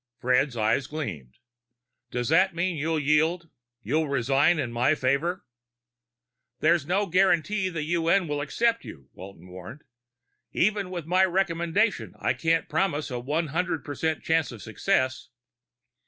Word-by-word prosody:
Fred's 125 0 +1
eyes 110 +5 +1
gleamed. 90 - -6 0.7
"Does 120 0 -2
that 185 +3 +3
mean 175 +1 -1
you'll 160 +2 -1
yield? 160 +3 +1 0.3
You'll 155 +8 0
resign 140 +5 +2
in 130 -6 -2
my 125 +6 +2
favor?" 145 +7 -1 1.1
"There's 160 -2 +2
no 195 +4 +1
guarantee 190 +2 +2
the 165 -4 -4
UN 170 +3 +1
will 145 -1 -2
accept 230 +10 0
you," 70 -3 -12
Walton 95 -1 -12
warned. 95 +10 -10 0.7
"Even 205 0 +1
with 175 -4 -5
my 180 +3 +3
recommendation, 190 +2 0
I - - 0
can't 165 0 0
promise 155 -3 -1
a 125 - -3
one 150 +6 -2
hundred 170 +1 -2
percent 155 +2 -2
chance 160 -2 +1
of 110 -5 -10
success." 130 - -1
160 Hz, 140 wpm, -26 LUFS, 135-175 Hz, 1.1 s, that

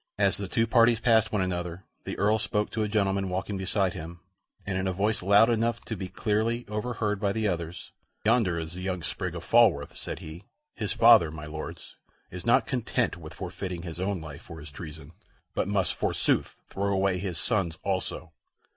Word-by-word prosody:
As 100 -1 +3
the 100 - -4
two 115 +4 +1
parties 115 0 +4
passed 115 -2 +3
one 105 -3 +1
another, 90 0 -3 0.2
the - - -4
Earl 105 +2 +3
spoke 105 0 -1
to 110 - -2
a 105 - +1
gentleman 100 -2 +1
walking 95 +2 -2
beside 95 -1 0
him 85 0 -8 0.5
and 95 - -2
in 95 +1 0
a 95 - 0
voice 105 +4 0
loud 100 +4 +6
enough 115 0 +1
to 110 - -5
be 95 -1 -5
clearly 110 +5 0
overheard 105 -1 -2
by 100 -1 +1
the 110 +1 0
others: 85 -2 -4 0.3
"Yonder 110 -7 +3
is 80 0 -4
the 90 - -7
young 90 -2 -2
sprig 90 0 -3
of 85 - -6
Falworth," 100 -9 +4
said - - -5
he. 80 +4 -9 0.3
"His 105 -4 -3
father, 115 -6 +7
my 75 -1 -7
Lords, 75 +1 -8 0.3
is - - -7
not - - +5
content - - 0
with - - -10
forfeiting 90 -3 -5
his 85 -1 -6
own 95 0 -1
life 80 -1 -9
for 80 - -10
his 75 -1 -9
treason, 80 0 -9 0.4
but - - 0
must, 100 -4 +1
forsooth, - - +1
throw 100 +1 -1
away 95 -1 +1
his 90 -3 -3
son's 95 -5 0
also. 95 -2 -2
95 Hz, 195 wpm, -28 LUFS, 85-105 Hz, 0.5 s, father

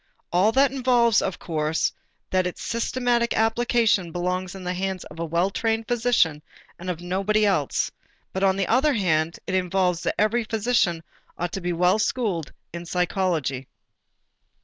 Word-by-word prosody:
All 185 +5 +4
that 270 +1 +4
involves 245 -4 +3
of 190 - -2
course 155 -1 -1 0.4
that 185 -1 +2
its 180 - -7
systematic 235 0 0
application 225 -4 +2
belongs 180 +2 -2
in 190 - -8
the 180 0 -2
hands 190 0 -3
of 150 - -12
the 170 - -2
well 170 +4 0
trained 225 +1 -1
physician 225 -11 +2 0.4
and 180 +1 -6
of 175 -2 -3
nobody 195 +4 +1
else, 180 -9 +1 0.4
but 190 - -2
on 190 -1 +4
the 195 -1 0
other 270 - +3
hand, 165 -5 +1
it 190 - -4
involves 180 -1 +1
that - - -1
every 220 +3 +2
physician 215 -7 0 0.3
ought 175 +1 -2
to 195 - -4
be 175 0 -1
well 180 +4 +2
schooled 210 - -1 0.2
in 170 0 -7
psychology. 170 -7 -1
190 Hz, 160 wpm, -24 LUFS, 175-225 Hz, 0.4 s, All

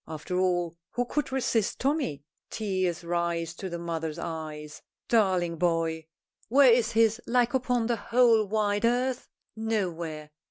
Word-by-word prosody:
After 160 +4 -4
all, 175 -2 +1 0.2
who 245 - 0
could 290 +3 -2
resist 245 -5 0
Tommy? 270 - -1 0.3
Tears 185 -5 -2
rise 170 -1 -1
to 190 +3 -6
the 170 - -4
mother's 165 -2 -4
eyes. 155 -2 -6 0.3
Darling 185 -7 +2
boy! 165 -1 0 0.4
Where 265 +1 +6
is 235 -1 +1
his 225 +1 +3
like 245 0 +2
upon 250 -2 +1
the 235 0 0
whole 230 -1 +4
wide 205 0 0
earth? 245 +2 0 0.3
Nowhere. 170 -9 -3
190 Hz, 135 wpm, -27 LUFS, 170-235 Hz, 0.4 s, Where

